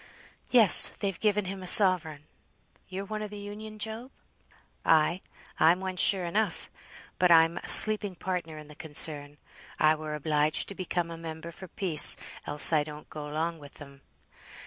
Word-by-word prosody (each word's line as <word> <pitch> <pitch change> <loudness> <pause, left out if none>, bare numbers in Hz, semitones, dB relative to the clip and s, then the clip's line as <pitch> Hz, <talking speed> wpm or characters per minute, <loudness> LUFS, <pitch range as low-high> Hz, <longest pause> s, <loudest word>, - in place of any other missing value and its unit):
"Yes, 235 -7 +6
they've 195 -3 -7
given 210 -2 -1
him 190 +1 -8
a 185 - -9
sovereign. 175 -7 +1 0.7
You're 190 +1 -8
one 215 +1 -7
of 210 - -7
th' 210 - -12
Union, 210 +1 -11
Job?" 220 +4 -5 0.7
"Ay! 165 +3 0 0.4
I'm 165 +3 +2
one, 190 -1 -7
sure 185 0 +2
enough; 210 +5 -4 0.5
but 180 - +2
I'm 165 0 +3
but - - -10
a - - -6
sleeping 210 -3 +2
partner 175 -3 -7
in 150 -1 -13
the 150 - -15
concern. 150 -2 -2 0.4
I 155 0 +2
were 155 -1 -7
obliged 150 0 -2
to - - -5
become 175 -2 -5
a 165 - -9
member 165 0 -10
for 185 +3 -13
peace, 170 -4 +8 0.3
else 150 +2 +3
I 150 -2 +1
don't 150 0 -13
go 150 -1 -9
along 165 +2 -5
with 145 -1 -16
'em. 140 -1 -15
170 Hz, 170 wpm, -26 LUFS, 155-195 Hz, 0.7 s, peace